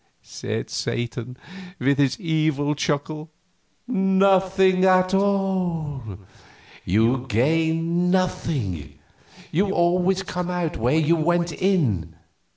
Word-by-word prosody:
said - - -5
Satan, 120 +1 -4 0.4
with 140 +2 +1
his 140 -2 +1
evil 155 -4 0
chuckle. 150 +2 -3 0.6
"Nothing 190 -3 +3
at 185 0 +4
all. 190 -7 0 0.8
You 115 +7 +1
gain 165 +8 +1
nothing; 115 - -2 0.5
you 195 +5 +1
always 180 +2 +1
come 180 -1 -4
out 175 -3 -2
where 125 +7 +1
you 160 +1 +3
went 170 +1 +1
in. 135 - 0
165 Hz, 95 wpm, -23 LUFS, 140-185 Hz, 0.8 s, at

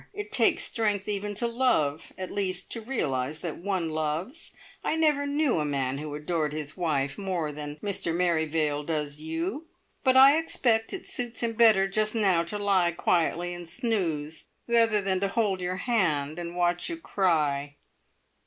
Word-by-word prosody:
It 415 +1 -5
takes - - +3
strength 210 -4 0
even 205 0 -2
to 225 - 0
love 230 - +1
at 185 -1 -5
least, 185 -2 -2
to 230 - -4
realise 150 - -2
that 170 -3 -5
one 180 -3 -1
loves. 155 - -2 0.3
I - - 0
never 300 -3 +2
knew 285 - +1
a - - +1
man 135 -2 -1
who 150 -1 -5
adored 150 0 -1
his 150 -1 -5
wife 145 -5 -1
more 180 -6 -2
than 145 0 -6
Mr 200 -4 -1
Merrivale 160 -3 +1
does 150 -2 -2
you; 170 - -4 0.4
but 260 -1 +4
I 275 +4 +8
expect 230 -8 +1
it 385 - -6
suits 240 -2 -3
him 230 -1 0
better 220 -4 +5
just 215 +3 0
now 190 -6 +3
to 210 +5 -4
lie 190 -4 +2
quietly 175 +1 +1
and 175 -1 -8
snooze 165 - -2 0.2
rather 230 -3 +3
than 190 -1 0
to 200 - +1
hold 200 -2 0
your 180 +1 -2
hand 170 - 0
and 170 0 -6
watch 175 0 +1
you 335 - -4
cry." 150 - 0
180 Hz, 170 wpm, -27 LUFS, 155-225 Hz, 0.4 s, I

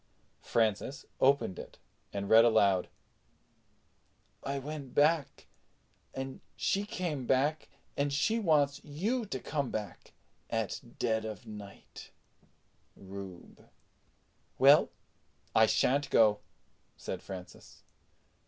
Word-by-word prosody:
Francis 115 +4 0
opened 135 -8 +2
it - - -10 0.3
and 100 0 -4
read 110 +2 +7
aloud: 100 -5 +3 1.5
"I 140 0 -2
went 140 -1 -7
back 150 -1 +2 0.7
and 135 0 -6
she 200 +1 0
came 155 - -3
back 145 +4 +1 0.3
and 140 0 0
she 220 +11 +1
wants 150 -7 +2
you 210 - -2
to 130 - -4
come 140 -1 -2
back 105 -2 -6 0.4
at 115 -3 -2 0.2
ded 110 -2 0
of 110 +2 -7
nite. 105 -2 -11 0.9
RUBE." 95 -2 -11 0.9
"Well, - - +6 0.6
I 110 0 +6
shan't 140 +6 +2
go," 105 -2 +4 0.6
said - - -5
Francis. 90 -2 -11
130 Hz, 100 wpm, -31 LUFS, 110-145 Hz, 1.5 s, read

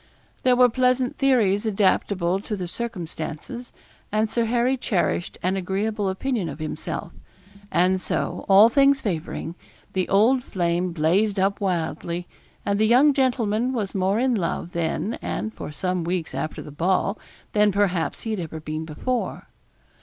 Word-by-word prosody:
There 255 -1 +4
were 250 0 +6
pleasant 255 +1 +1
theories 225 -6 +2
adaptable 190 -3 +1
to 210 +1 -4
the 185 -3 -4
circumstances; 205 - -6 0.4
and 215 +1 +1
Sir 235 0 +1
Harry 240 +3 +2
cherished 190 -7 -1
an 185 +2 +1
agreeable 195 +2 -1
opinion 200 -2 -2
of 140 - -7
himself; 155 -1 -5 0.6
and 185 +1 +2
so, - - -2
all 200 +3 +9
things 275 +3 +4
favouring; 170 -5 -3 0.4
the 185 -1 -1
old 235 +6 +4
flame 175 -2 -1
blazed 185 +6 +2
up 195 +2 +1
wildly, 175 -1 -2 0.4
and 200 0 +1
the 220 - +4
young 265 +6 +6
gentleman 250 -3 +1
was 210 -6 -2
more 195 +1 +1
in 255 +2 +2
love 175 -4 -2
then, 170 +6 -2
and 220 - -3
for - - -7
some 180 +2 -2
weeks 170 -3 -2
after 135 +4 -4
the 150 - -10
ball, 185 +6 0 0.3
than 210 -1 +4
perhaps 185 -6 0
he 225 - -4
had 215 - -2
ever 160 -2 -5
been 155 +1 -4
before. 235 +11 -3
200 Hz, 155 wpm, -24 LUFS, 175-235 Hz, 0.6 s, all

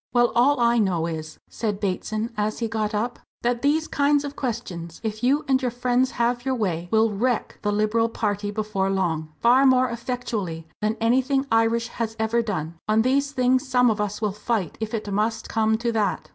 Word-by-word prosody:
"Well, 240 -1 +4
all 255 +3 +4
I 235 0 +3
know 180 -6 +1
is," 155 -2 -5
said 210 -3 -3
Bateson, 215 +3 -2
as 210 +1 -1
he 230 - -1
got 215 -1 -2
up, 235 +4 -2 0.2
"that 240 0 0
these 310 +3 +2
kinds 285 0 +2
of 285 0 -6
questions, 190 - -5
if 215 -1 -3
you 275 +4 +2
and 265 -1 +3
your 250 - 0
friends 245 +2 +1
have 240 0 +1
your 265 0 0
way, 175 -7 -2
will 220 +1 +3
wreck 235 +3 -1
the 205 - 0
Liberal 215 +2 +1
party 205 -2 -2
before 205 -2 -1
long 165 -5 -1
far 250 +3 +5
more 255 -1 +4
effectually 225 -9 -4
than 215 +1 0
anything 260 +4 +2
Irish 225 +1 +2
has 225 -2 -4
ever 220 +1 +1
done. 170 -7 -4
On 215 +1 +3
these 275 +3 +1
things 255 0 +2
some 250 -2 +4
of 210 -1 -1
us 210 +1 -3
will 210 - +1
fight, 210 -3 -2
if 220 +1 -2
it 210 -2 -4
must 220 +2 -1
come 220 0 +2
to 235 +1 -1
that." 215 -3 -1
225 Hz, 200 wpm, -24 LUFS, 210-245 Hz, 0.2 s, far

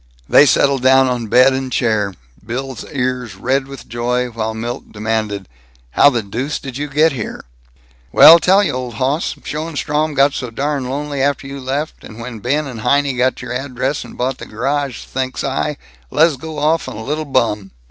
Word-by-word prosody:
They 145 - +6
settled 135 0 +3
down 130 +1 +5
on 120 -2 -2
bed 130 +4 +5
and 130 -1 -3
chair, 110 -6 0 0.3
Bill's 130 +2 -5
ears 125 -5 -2
red 130 +7 0
with 135 -1 -10
joy, 125 +2 -1
while 110 -1 -3
Milt 120 +3 -5
demanded: 105 -2 -2 0.4
"How 145 - +6
the 120 -5 -1
deuce 125 +9 -3
did 135 -3 -8
you 145 +2 -3
get 150 +3 +3
here?" 120 - -6 0.7
"Well, 165 - +9
tell 190 +4 +4
you, - - 0
old 125 -2 -5
hoss. 135 +7 -1
Schoenstrom 155 -1 -2
got 140 +1 +4
so 125 - -4
darn 140 +1 -2
lonely 145 0 -3
after 140 0 0
you 140 0 -7
left, 140 +4 -4
and 110 - -11
when 115 -1 -7
Ben 145 +7 0
and 125 -5 -7
Heinie 140 +2 +2
got 125 +1 0
your 125 -1 -5
address 130 +2 -2
and - - -12
bought 130 +1 -2
the - - -8
garage, 135 +3 -2
think's 130 0 -3
I, 140 +2 -1 0.3
lez 160 0 +3
go 155 +3 -8
off 155 +3 +1
on - - -8
a 110 - -6
little 150 +5 -2
bum." 115 -8 0
130 Hz, 190 wpm, -18 LUFS, 120-145 Hz, 0.7 s, Well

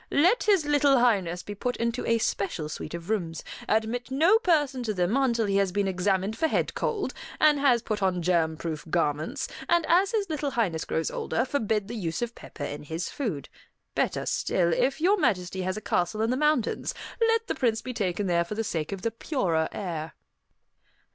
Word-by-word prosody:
"Let 360 +12 +3
his 390 -7 +4
little 290 -2 +4
highness 195 -8 +2
be 205 - -6
put 245 +5 -3
into 235 +1 -1
a 230 - +3
special 195 -8 -2
suite 155 +1 -6
of 170 0 -8
rooms; 165 -7 -2 0.3
admit 225 +3 0
no 330 +11 +4
person 295 - +2
to 220 -3 -2
them 180 +5 +1
until 240 -5 +2
he 195 -1 +1
has 195 -2 +2
been 200 +1 0
examined 190 +2 0
for 320 - +1
head - - 0
cold, 415 -3 -2 0.3
and 300 -2 +5
has 250 -5 +3
put 215 -3 -2
on 180 -2 +1
germ 165 -2 +2
proof 155 -2 -4
garments; 160 - 0 0.2
and 340 -1 +3
as 375 +3 +4
his 420 -3 0
little 305 -3 -2
highness 210 -11 -1
grows 160 - -1
older, 230 - -1
forbid 220 -7 -1
the 230 - -6
use 185 -2 -2
of 240 0 -4
pepper 145 - -9
in 145 - -5
his 160 +3 -4
food. 200 - -3 0.5
Better - - 0
still, 170 -2 +1
if 270 - +1
Your 380 +6 +4
Majesty 190 - 0
has 185 +2 -2
a - - -5
castle 215 +3 0
in 225 - +1
the - - +1
mountains, 300 -4 +1 0.3
let 455 0 +3
the - - -1
Prince 230 -3 0
be 255 - -5
taken 200 -3 -1
there 170 -2 +2
for 190 +5 -6
the 225 - -1
sake 160 -6 -3
of 195 -2 -5
the 230 - 0
purer 185 - 0
air." 165 -5 -4
220 Hz, 200 wpm, -27 LUFS, 180-275 Hz, 0.5 s, and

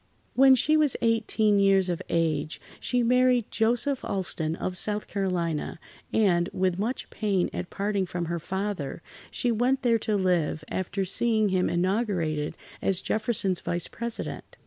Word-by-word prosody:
When 265 0 +7
she 305 +4 +3
was 305 -3 +3
eighteen 220 -2 +2
years 195 -1 +4
of 175 -2 -2
age, 155 -2 0 0.2
she 245 -1 0
married 250 -1 +3
Joseph 245 +5 +1
Alston 165 -4 -1
of 180 +1 -4
South 210 +3 +1
Carolina, 175 -6 -2 0.3
and, 180 -5 +2
with 185 -1 0
much 230 +6 -2
pain 200 -5 0
at - - -4
parting 200 -1 -1
from 175 0 -3
her 170 +1 -3
father, 190 -4 -4 0.3
she 245 - 0
went 250 +4 +1
there 230 -2 +3
to 215 0 -1
live, 180 -5 0
after 190 +1 -2
seeing 215 +2 +2
him 185 -1 +1
inaugurated 175 -5 -1 0.2
as 190 -2 +1
Jefferson's 215 -4 +1
Vice 175 0 -2
President. 235 -1 -6
195 Hz, 145 wpm, -27 LUFS, 175-230 Hz, 0.3 s, When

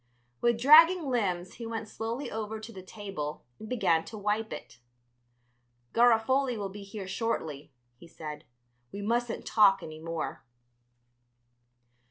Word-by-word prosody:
With 235 -1 +2
dragging 320 +4 +7
limbs 185 -7 -1
he 230 - -7
went 225 -1 -4
slowly 230 +5 -4
over 220 0 -4
to 225 +1 -10
the 190 - -9
table 190 -7 -6
and 215 - -9
began 170 -10 +2
to 220 - -8
wipe 210 +2 -1
it. 120 - -9 1.1
"Garofoli 240 +2 +3
will 200 -2 -3
be 205 +2 -9
here 200 -1 -7
shortly," 175 - -3 0.3
he 170 - -14
said; 155 -2 -8 0.5
"we 200 0 -6
mustn't 235 +2 -1
talk 200 -3 +5
any 155 0 -8
more." 165 0 -4
215 Hz, 135 wpm, -29 LUFS, 185-235 Hz, 1.1 s, dragging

